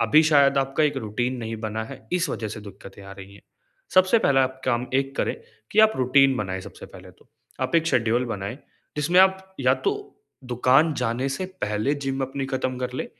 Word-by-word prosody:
अभी 155 +1 +5
शायद 140 -2 +4
आपका 135 +2 0
एक 145 -2 0
रूटीन 120 +2 -2
नहीं 115 -1 -5
बना 110 0 -3
है, 110 - -11
इस 180 -2 +1
वज़ह 110 -4 -4
से 110 - -7
दिक्कतें 100 0 -12
आ 95 0 -10
रही 100 0 -12
हैं। 100 - -17 0.5
सबसे 185 +5 +5
पहला 135 -10 +3
आप 130 0 -6
काम 125 0 0
एक 135 0 0
करें - - 0 0.4
कि 215 - +4
आप 220 0 +6
रूटीन 135 +1 +4
बनाएँ 95 -2 -3
सबसे - - -11
पहले - - -13
तो, - - -25 0.3
आप 130 +4 -2
एक 165 0 +1
शेड्यूल 120 -3 +1
बनाएँ, 105 +3 -5 0.4
जिसमें 170 +5 +4
आप 190 0 +2
या - - +4
तो 410 0 -4 0.3
दुकान 135 +6 +3
जाने 125 +2 -1
से 135 +7 -3 0.2
पहले 105 +7 0
जिम 135 0 -2
अपनी 135 +1 -3
खत्म 130 -1 -2
कर 125 0 -4
लें 130 - -3
130 Hz, 205 wpm, -24 LUFS, 115-150 Hz, 0.5 s, आप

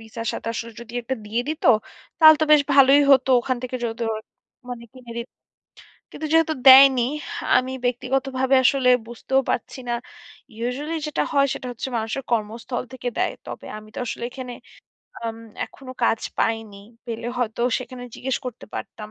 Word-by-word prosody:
Visa 225 +1 -8
সাথে - - -5
আসলে 230 0 -5
যদি 235 0 -11
একটা 260 +3 -2
দিয়ে 225 +3 -1
দিত, 310 0 -4 0.5
তাহলে 315 -1 +9
তো - - +3
বেশ 295 -1 +7
ভালোই 275 +1 +7
হতো 265 0 +4
ওখান 255 0 -1
থেকে 255 0 -3
যদিও 225 0 -2 0.6
মানে 235 -1 -6
কিনে 250 -3 -11
দিত 235 +1 -5 0.8
কিন্তু 310 - -5
যেহেতু 325 -1 +4
দেয়নি, 265 -1 +9 0.5
আমি 255 +1 0
ব্যক্তিগতভাবে 260 +1 0
আসলে 260 -1 +4 0.2
বুঝতেও 265 +3 0
পারছি 245 - -3
না। 240 - 0 0.6
ইউজুয়ালি 265 +8 -3
যেটা 300 - -1
হয় 280 -1 +4
সেটা - - -7
হচ্ছে 245 +2 -5
মানুষের 225 +4 -2
কর্মস্থল 230 +2 -2
থেকে 255 -1 -4
দেয়। - - +1
তবে - - -8
আমি 215 0 -13
তো - - -6
আসলে 235 - -4
এখানে। 255 -1 -7 0.6
এ্যাম 230 -1 -5 0.3
এখনো 260 -2 -11
কাজ 225 - +2 0.2
পাইনি। 225 -2 -1 0.3
পেলে 230 0 -4
হয়তো 235 -1 -1 0.2
সেখানে 255 -1 -9
জিজ্ঞেস 265 0 -2
করতে 245 -2 -7
পারতাম। 210 +1 -7
250 Hz, 160 wpm, -23 LUFS, 230-270 Hz, 0.8 s, তাহলে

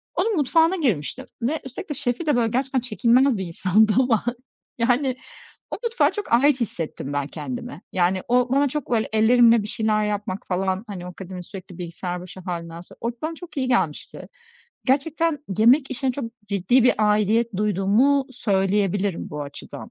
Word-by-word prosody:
Onun 445 -1 +1
mutfağına 325 +3 +3
girmiştim 255 - -1
ve 285 +7 0
üstelik 265 +7 -8
de - - -1
şefi 265 +2 -2
de, 295 - +2
böyle, 235 -2 +2
gerçekten 260 +2 0
çekilmez 250 +1 +3
bir 190 - -3
insandı 200 +5 +2
ama, 245 -5 +2 0.5
yani, 250 +2 +1 0.5
o - - -3
mutfağa 470 0 +2
çok 415 - -6
ait 270 +3 +4
hissettim 165 -9 -4
ben 145 -1 -1
kendimi. 145 +1 -6
Yani, 185 +1 +1
o 245 0 +2
bana 280 +2 +3
çok, 295 -1 -4
böyle, 225 -2 +1
ellerimle 230 0 +5
bir - - -5
şeyler 215 0 0
yapmak 205 0 -3
falan, 190 +1 -1
hani, 185 -4 -7
o - - -6
akademi, 180 0 -8
sürekli 185 -1 -10
bilgisayar 175 0 -5
başı 180 +1 -10
hâlinden 170 -2 -6
sonra, 180 - -14
o 235 - -1
bana 320 +1 -3
çok 345 -1 -12
iyi 260 -2 0
gelmişti. 245 -1 -1 0.6
Gerçekten 295 +4 +1 0.2
yemek 260 +6 +5
işine 260 0 -1
çok 275 +1 -4 0.2
ciddi 200 +5 +2
bir 250 - +5
aidiyet 215 +1 +2
duyduğumu 210 +8 +2
söyleyebilirim 200 -4 0
bu 150 0 -4
açıdan. 145 0 -9
225 Hz, 170 wpm, -23 LUFS, 190-265 Hz, 0.6 s, ellerimle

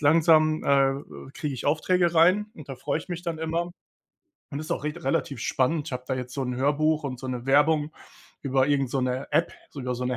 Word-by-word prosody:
langsam, 155 0 +4
äh, 135 -1 0
kriege 145 -3 -3
ich 125 - -5
Aufträge 170 +3 +2
rein 185 +6 +5
und 150 -3 -12
da 135 - -5
freue 145 +3 -2
ich 160 - -11
mich 175 -1 -5
dann 170 -3 -3
immer 165 +2 -2 0.8
und 145 0 -4
ist 155 - -8
auch - - -4
richt 155 +3 -4
relativ 135 +1 -1
spannend. 150 +4 0
Ich - - -8
habe 125 0 -4
da 130 - -1
jetzt 125 -1 -5
so 135 - -2
'n 125 -1 -2
Hörbuch 150 +3 +1
und 130 -3 -4
so 130 - -6
'ne 125 -1 -4
Werbung 150 +2 +3 0.5
über 135 -1 +2
irgend 135 -3 +1
so 135 - 0
'ne 125 0 -1
App, - - +2 0.2
sogar 125 -2 -4
so 125 - -4
'ne 125 -1 -1
145 Hz, 225 wpm, -26 LUFS, 130-160 Hz, 0.8 s, rein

